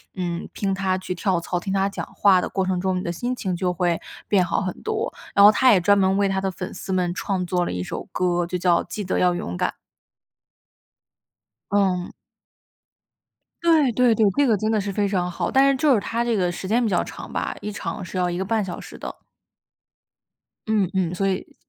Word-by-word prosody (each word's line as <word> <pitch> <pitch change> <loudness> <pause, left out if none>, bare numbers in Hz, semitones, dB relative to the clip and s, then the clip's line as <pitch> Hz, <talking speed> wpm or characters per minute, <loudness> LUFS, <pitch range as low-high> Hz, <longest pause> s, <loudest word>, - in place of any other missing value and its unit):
嗯， 175 -2 -3
听 195 -1 -1
他 190 -1 0
去 185 -1 -4
跳 180 -1 0
操， 175 +1 -2
听 190 +2 -4
他 195 0 +1
讲 - - -5
话 190 -2 +5
的 - - -2
过 190 -1 -1
程 185 -1 0
中， 190 0 0
你 - - -2
的 170 - -2
心 245 +8 -3
情 190 -6 -3
就 180 0 -1
会 175 -1 0 0.3
变 190 -3 +4
好 175 - 0
很 185 -2 -2
多。 440 0 -2 0.2
然 200 - +8
后 210 - +10
他 255 +4 +5
也 185 - +4
专 200 +3 +4
门 190 0 +3
为 200 0 +2
他 190 0 0
的 190 0 -1
粉 185 +1 -6
丝 190 - -5
们 180 -1 0
创 185 0 -2
作 180 0 0
了 - - -3
一 90 0 -3
首 - - -6
歌， 175 -1 0
就 180 - -2
叫 175 -1 +3
《记 205 +4 -5
得 185 - -1
要 180 -1 +3
勇 90 - -4
敢》。 - - +1 2.0
嗯。 190 -3 +1 1.5
对， 315 -7 +4
对， 245 0 +4
对， 220 -1 +4
这 285 - +4
个 225 -6 +3
真 215 +3 -1
的 215 - +2
是 200 0 -3
非 205 +1 +1
常 180 -3 -1
好， - - -2
但 275 +1 +4
是 275 - +1
就 280 +1 +4
是 215 - +2
它 230 +3 -2
这 235 -2 +1
个 180 -2 +1
时 175 +2 -6
间 235 +5 +2
比 215 - 0
较 175 - +1
长 - - -9
吧， - - -2
一 210 - -4
场 205 -1 -5
是 185 +1 -5
要 180 - +1
1 175 - -2
个 190 - -2
半 220 +2 0
小 180 - -6
时 - - -11
的。 - - -6 1.5
嗯， 215 -4 +2
嗯， 180 -2 0
所 195 +2 0
以 190 - -4
190 Hz, 240 characters per minute, -23 LUFS, 180-210 Hz, 2.0 s, 后